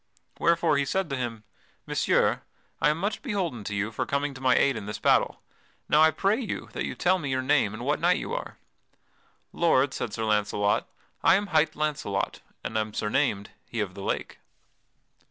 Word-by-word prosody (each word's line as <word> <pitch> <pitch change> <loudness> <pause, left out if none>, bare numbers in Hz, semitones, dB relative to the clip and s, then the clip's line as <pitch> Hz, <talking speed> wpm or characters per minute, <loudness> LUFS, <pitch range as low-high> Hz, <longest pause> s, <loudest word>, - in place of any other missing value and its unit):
Wherefore 170 -3 +3
he 140 - +1
said 190 +1 -1
to - - 0
him: 120 -4 -4 0.4
"Messire, - - +2 0.4
I - - +5
am 150 - +1
much 200 +5 -2
beholden 185 - -2
to 105 - -3
you 105 +2 -1
for 110 - -3
coming 140 0 -1
to 130 - -11
my 130 -1 +4
aid 140 -2 +3
in 105 -2 -6
this 105 - -4
battle. - - +2 0.4
Now 150 - +4
I 160 - +7
pray 195 - +1
you 230 -7 -4
that - - -2
you - - -4
tell 185 +1 +2
me 145 -5 -4
your 130 0 0
name 135 -6 +3
and 120 +3 -6
what 145 +2 +1
knight 175 +2 +3
you - - -4
are." - - -5 1.0
"Lord," 140 -5 +3
said 115 - -3
Sir 110 +1 -3
Launcelot, 105 -1 +1 0.3
"I - - +6
am 205 +2 +1
hight 155 -1 +3
Launcelot, 150 -10 -2 0.2
and 110 - -1
am 110 -1 -3
surnamed 105 -3 0 0.2
'He 115 - -5
of 100 -4 -2
the 100 - -9
Lake.'" - - -3
135 Hz, 195 wpm, -27 LUFS, 110-165 Hz, 1.0 s, I